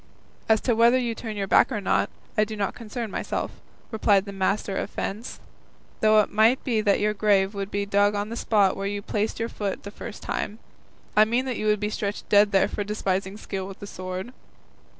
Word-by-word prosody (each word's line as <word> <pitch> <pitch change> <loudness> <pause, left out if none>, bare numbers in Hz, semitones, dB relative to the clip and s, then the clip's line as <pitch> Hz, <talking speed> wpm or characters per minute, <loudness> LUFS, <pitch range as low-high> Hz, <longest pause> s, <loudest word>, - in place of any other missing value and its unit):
"As 220 -1 +5
to 245 - +1
whether 235 +2 +5
you 240 -2 -1
turn 220 -1 -6
your 200 - -1
back 195 - +4
or 220 - -1
not, 200 - +1 0.3
I 215 - +4
do 215 0 -4
not 200 -2 -1
concern 230 -1 -6
myself," - - -3 0.4
replied 205 -3 +3
the 200 - -6
master 195 +1 -1
of - - -2
fence; 215 +5 -5 0.6
"though 215 0 +6
it - - -4
might 220 +5 +4
be 230 -5 +1
that 205 -2 +3
your 210 0 +1
grave 200 -1 +2
would 200 -1 -4
be 200 0 -1
dug 205 +1 +3
on 205 +1 -2
the 230 - -5
spot 205 -5 +2
where 195 0 -3
you 205 0 -3
planted 210 +2 -1
your 230 +1 -1
foot 200 -2 -4
the 200 - -7
first 215 +1 -9
time; 210 +1 -3 0.6
I 215 - +8
mean 240 +4 0
that 255 -3 -2
you 215 - -2
would 210 -1 +3
be 210 0 -2
stretched 205 -1 -3
dead 205 0 +5
there 195 -2 +4
for 205 - -3
despising 195 -1 -2
skill 195 -3 -5
with 195 - -9
the - - -7
sword." 185 +4 -6
210 Hz, 220 wpm, -25 LUFS, 200-220 Hz, 0.6 s, I